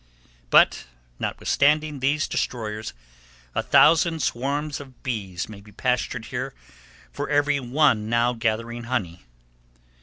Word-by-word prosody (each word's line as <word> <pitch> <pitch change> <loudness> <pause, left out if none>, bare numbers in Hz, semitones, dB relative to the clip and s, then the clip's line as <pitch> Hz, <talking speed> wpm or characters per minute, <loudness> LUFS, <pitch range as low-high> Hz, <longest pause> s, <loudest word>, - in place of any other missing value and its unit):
But - - +4 0.3
notwithstanding 150 0 +1
these 140 +4 +1
destroyers, 110 - -3 0.6
a - - 0
thousand 165 -2 +4
swarms 140 +4 -2
of 135 -3 -13
bees 100 -9 -3
may 105 -2 -11
be 105 +1 -16
pastured 125 0 -1
here - - -3 0.6
for - - -4
every 145 -1 +2
one 125 -4 +2
now 120 +1 +2
gathering 115 +1 -2
honey. 95 - -3
125 Hz, 115 wpm, -24 LUFS, 110-145 Hz, 0.6 s, But